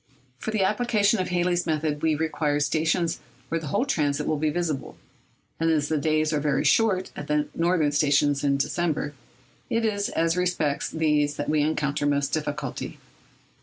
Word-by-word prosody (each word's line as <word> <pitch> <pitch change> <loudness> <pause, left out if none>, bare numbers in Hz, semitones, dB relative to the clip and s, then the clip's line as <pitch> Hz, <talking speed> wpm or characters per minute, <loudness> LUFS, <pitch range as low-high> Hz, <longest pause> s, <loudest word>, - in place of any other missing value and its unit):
For - - -4
the 215 -3 +1
application 210 0 +2
of 185 - -1
Halley's 175 0 0
method 155 -2 -1
we 160 -1 +2
require 150 -1 0
stations 160 +3 0 0.3
where 165 - 0
the 155 - -6
whole 205 - +1
transit 150 - 0
will 155 - 0
be 155 0 +1
visible; 155 -4 -3 0.6
and 165 0 +2
as 150 -2 +1
the 160 - +1
days 155 +1 +1
are 150 - +1
very 145 -1 0
short 195 -5 +2
at 145 - -7
the 150 0 0
northern 165 -3 +2
stations 145 -1 +2
in 140 -1 +2
December, 150 +1 -1 0.6
it 230 0 +1
is 205 -2 0
as 165 0 +1
respects 175 -5 0
these 150 -2 +1
that 145 - -3
we 155 -1 +2
encounter 150 -1 0
most 140 -1 +1
difficulty. 145 -3 -3
155 Hz, 170 wpm, -25 LUFS, 145-175 Hz, 0.6 s, application